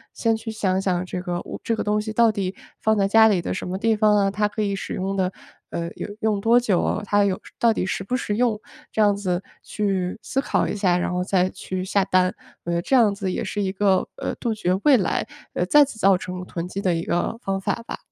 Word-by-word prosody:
先 225 -1 +1
去 225 0 -6
想 195 -3 0
想 185 -2 0
这 180 0 -4
个 175 -1 -3
物 - - -8
这 230 - 0
个 - - -2
东 210 0 +1
西 215 0 -5
到 230 0 +4
底 195 -2 -3 0.3
放 220 0 +2
在 195 -1 +3
家 220 +2 +6
里 205 -4 +3
的 175 - -3
什 185 - -4
么 185 - -3
地 225 +2 +2
方 210 -1 +4
啊？ 195 -1 +2
它 210 +1 +1
可 210 +1 -3
以 200 -1 -1
使 195 - -5
用 195 +1 -2
的 185 -1 0 0.4
呃， 170 0 -4
有 - - -5
用 215 -3 +1
多 230 +3 +5
久？ 210 -4 0
它 205 0 +3
有 190 -2 0 0.2
到 235 -3 +4
底 220 - -1
实 190 - -2
不 250 +6 -1
实 210 -4 -2
用？ 230 -2 +1 0.3
这 - - -4
样 205 -1 +5
子 190 -2 -2 0.2
去 195 -2 -2
思 270 - -1
考 - - 0
一 - - -3
下， 185 -4 +2
然 180 - -1
后 180 0 0
再 185 -1 +2
去 185 0 -5
下 195 +1 +2
单。 185 -1 +2 0.3
我 170 - -3
觉 - - 0
得 170 - +1
这 265 - +1
样 225 -5 +5
子 200 -2 -3
也 - - -2
是 205 - -3
一 190 - 0
个， 190 -1 +2
呃， - - -3
杜 225 -2 -1
绝 180 -3 0
未 285 -4 +6
来 185 -5 -1 0.4
再 295 -1 +7
次 225 -5 -10
造 195 -1 +5
成 180 0 -6
囤 170 0 -4
积 195 +2 -5
的 180 -3 +1
一 165 - -2
个 175 +7 -1
方 195 0 -1
法 230 +4 -2
吧。 - - -5
200 Hz, 275 characters per minute, -23 LUFS, 185-220 Hz, 0.4 s, 再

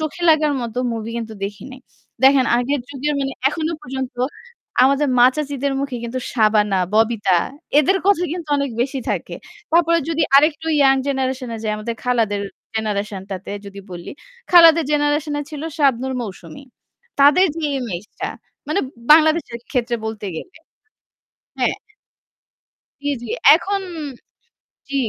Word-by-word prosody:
চোখে 315 +3 -4
লাগার 305 -2 +4
মত 235 -1 -5 0.2
movie 225 0 -5
কিন্তু 225 -1 -6
দেখি 200 0 -7
নাই। 260 - -12 0.4
দেখেন 270 -1 +6
আগের 270 +3 0
যুগের 285 +2 -2
মানে 270 0 -2 0.2
এখনো 315 +2 -2
পর্যন্ত 265 -2 -5 0.7
আমাদের 275 +2 +3
মা 245 - +8
চাচিদের 280 -2 -2
মুখে 275 -3 -3
কিন্তু 235 +2 -4
Shabana, 210 -4 +2
Bobita 215 -5 +3 0.4
এদের 380 +7 +3
কথা 400 -3 +4
কিন্তু 340 -3 -6
অনেক 280 -2 -1
বেশি 270 +2 -1
থাকে। - - -3 0.4
তারপরে 335 0 +4
যদি 325 -1 0
আরেকটু 305 +2 +3 0.2
young 270 -1 +5
generation 265 -2 -2
এ - - -4
যাই 215 - -1
আমাদের 230 +2 -4
খালাদের 225 -5 +1 0.3
generation 210 -2 -2
টাতে 190 +1 -6
যদি 200 0 -9
বলি 175 -1 -8 0.4
খালাদের 335 -2 +7
generation 295 +1 +1
এ - - -1
ছিল 300 -1 -7
Shabnur, 265 -3 +1
Mousumi. 185 - -8 0.6
তাদের 295 +7 +6
যে 325 - -3 0.2
image 205 -4 -5
টা - - -1 0.4
মানে 390 - +1 0.3
বাংলাদেশের 315 -5 +3
ক্ষেত্রে 240 -2 0
বলতে 220 -2 -5
গেলে 365 - -9 1.0
হ্যাঁ। - - +1 1.3
জি, 290 - -4 0.2
জি। 230 - -7 0.2
এখন 390 +5 0 1.1
জি। 280 - -4
265 Hz, 140 wpm, -20 LUFS, 225-300 Hz, 1.3 s, মা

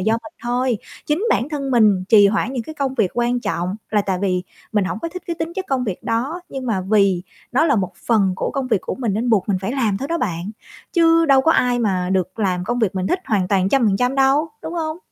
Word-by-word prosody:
do 220 +4 +1
mình 270 +8 -4
thôi. 245 -1 0 0.3
Chính 310 +9 0
bản 245 - +1
thân 280 -3 -3
mình 210 -6 +4
trì 205 -2 +7
hoãn 225 +4 0
những 245 -3 -2
cái 315 - -9
công 275 -2 -2
việc 215 -7 +1
quan 240 0 0
trọng 190 -2 -2
là 210 -2 +2
tại 190 -2 -1
vì 180 -2 0 0.3
mình 205 -3 +2
hổng 205 - -3
có 335 - -4
thích 365 +1 -8
cái 340 -2 -3
tính 325 +1 -3
chất 380 - -3
công 260 -2 0
việc 195 -5 -4
đó 270 +10 -2
nhưng 265 -2 -6
mà 205 -5 0
vì 195 -2 +2 0.3
nó 275 +6 +3
là 280 -7 +3
một 185 -2 -1
phần 205 -5 +3
của - - -2
công 270 -2 -2
việc 215 -6 +2
của - - -4
mình 235 -6 -2
nên 235 +3 0
buộc 210 -2 +2
mình 190 -2 +1
phải 195 +6 -3
làm 225 -7 0
thôi 275 +6 -5
đó 335 - -1
bạn, 175 - -3 0.4
chứ 330 -1 +4
đâu 270 -2 +5
có 325 +4 +3
ai 245 -1 +2
mà 185 -5 0
được 185 +2 -1
làm 185 -3 0
công 240 +5 -1
việc 210 -5 0
mình 185 0 -1
thích 365 - +1
hoàn 195 -5 +1
toàn 190 -2 +2
trăm 255 +2 +3
phần 195 - +2
trăm 250 +4 0
đâu, 275 +3 +3
đúng 335 - -5
hông? 320 0 -3
230 Hz, 265 wpm, -20 LUFS, 195-275 Hz, 0.4 s, trì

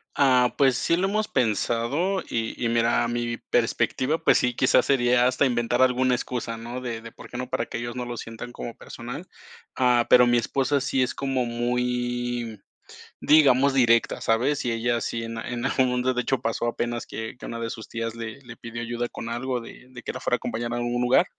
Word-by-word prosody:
Ah, 125 -3 +4
pues, 135 -3 +4
sí 170 - +2
lo 185 +3 +1
hemos 215 +2 0
pensado, 125 - 0
y 115 +1 -3
y 115 - +2
mira, 115 0 +2
mi 120 0 -2
perspectiva, 120 +5 0
pues 165 - +4
sí, 125 -1 0
quizás, 130 - +4
sería 125 -2 +3
hasta 130 +3 +2
inventar 120 0 +1
alguna 130 0 +3
excusa, 120 -2 -4
¿no? 120 +3 -6
De 115 -3 -4
de, 115 0 -10
¿por - - -13
qué 120 - -7
no? 125 0 -4
Para 115 - -1
que - - -5
ellos 120 +1 -5
no 125 -1 -3
lo 120 0 -5
sientan 115 +2 -7
como 120 -1 -7
personal. 125 +10 -8 0.5
Ah, 125 -2 +3
pero 125 0 +8
mi 120 0 +3
esposa 135 +3 +1
sí 135 -1 +1
es 125 - -2
como 135 -2 -1
muy, 120 -1 -2 0.6
digamos, 140 -3 +5
directa, 115 -3 +3
¿sabes? 125 +6 +1
Y 120 - +1
ella 120 +1 0
sí 115 +2 -3
en 115 0 -6
en 120 +1 -4
algún 130 -1 +2
mundo, 125 +1 +1
de 125 - 0
hecho, 125 +2 0
pasó 115 0 -1
apenas 120 0 -2
que 110 +1 -6
que - - -10
a - - -6
una 115 - -5
de 115 0 -3
sus 110 - -8
tías 115 0 -3
le 115 +3 -6
le 120 -3 -11
pidió 115 0 -7
ayuda 120 +1 -2
con 115 - -7
algo 125 +2 -2
de 120 +2 -12
de 120 -2 -11
que - - -4
la - - -6
fuera - - +1
a - - -2
acompañar 120 +1 -4
a 120 - -1
un 120 0 -1
lugar, 125 +8 +4
120 Hz, 220 wpm, -25 LUFS, 115-130 Hz, 0.6 s, pero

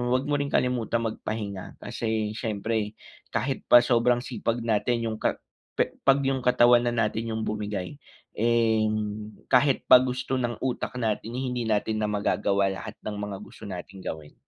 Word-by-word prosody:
'wag 130 - +1
mo 145 - +2
ring 140 0 -2
kalimutang 120 -2 +1
magpahinga 105 -3 -5
kasi 110 -2 -2
siyempre 110 -1 -2 0.4
kahit 130 +5 -1
pa 120 - +8
sobrang 120 0 +3
sipag 120 -1 -2
natin 115 +1 0
yung 110 - -2
ka - - -1 0.4
pe - - +1
'pag 135 0 +5
yung 135 -1 0
katawan 120 -1 +5
na 120 - +1
natin 115 0 -1
yung 110 0 -2
bumigay, 105 +2 -3 0.4
eh, 115 -1 +3 0.6
kahit 135 +1 +3
pa - - +10
gusto 130 +1 -2
ng 120 -1 -1
utak 130 -1 -2
natin, 110 -1 -1
hindi 125 -2 -2
natin 110 0 0
na - - +1
magagawa 100 -1 +1
lahat 110 +3 -7
ng 105 - -4
mga 105 -1 -4
gusto - - -14
nating 95 0 -8
gawin. 80 -2 -6
115 Hz, 160 wpm, -26 LUFS, 105-125 Hz, 0.6 s, pa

